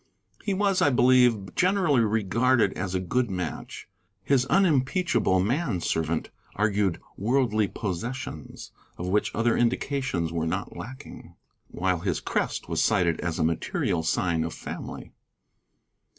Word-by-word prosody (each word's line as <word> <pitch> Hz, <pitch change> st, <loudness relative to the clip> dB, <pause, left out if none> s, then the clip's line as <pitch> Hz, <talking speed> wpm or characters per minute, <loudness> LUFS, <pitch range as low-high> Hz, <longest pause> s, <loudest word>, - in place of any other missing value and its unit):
He 200 Hz, -, 0 dB
was, 195 Hz, -1 st, +2 dB
I -, -, +5 dB
believe, 125 Hz, -6 st, +4 dB
generally 180 Hz, -8 st, +3 dB
regarded 110 Hz, +1 st, +2 dB
as 95 Hz, 0 st, -3 dB
a -, -, +1 dB
good 120 Hz, +6 st, 0 dB
match; 90 Hz, -5 st, -5 dB, 0.4 s
his 135 Hz, -2 st, +2 dB
unimpeachable 165 Hz, -, +2 dB
man 120 Hz, -, 0 dB
servant 80 Hz, -1 st, -1 dB, 0.2 s
argued 100 Hz, -3 st, +1 dB, 0.2 s
worldly 110 Hz, -1 st, +1 dB
possessions, 100 Hz, -, -5 dB, 0.3 s
of 90 Hz, -, -4 dB
which 105 Hz, +3 st, +1 dB
other 115 Hz, +1 st, +2 dB
indications 120 Hz, -, 0 dB
were 80 Hz, -1 st, -1 dB
not -, -, -3 dB
lacking, 130 Hz, +4 st, -10 dB, 0.3 s
while 90 Hz, 0 st, -1 dB
his 90 Hz, -2 st, -1 dB
crest -, -, -2 dB
was -, -, 0 dB
cited 90 Hz, -7 st, +2 dB
as 85 Hz, -2 st, -2 dB
a 80 Hz, -, +1 dB
material 80 Hz, +1 st, 0 dB
sign 80 Hz, 0 st, 0 dB
of 80 Hz, -, -4 dB
family. -, -, -7 dB
105 Hz, 130 wpm, -26 LUFS, 90-130 Hz, 0.4 s, I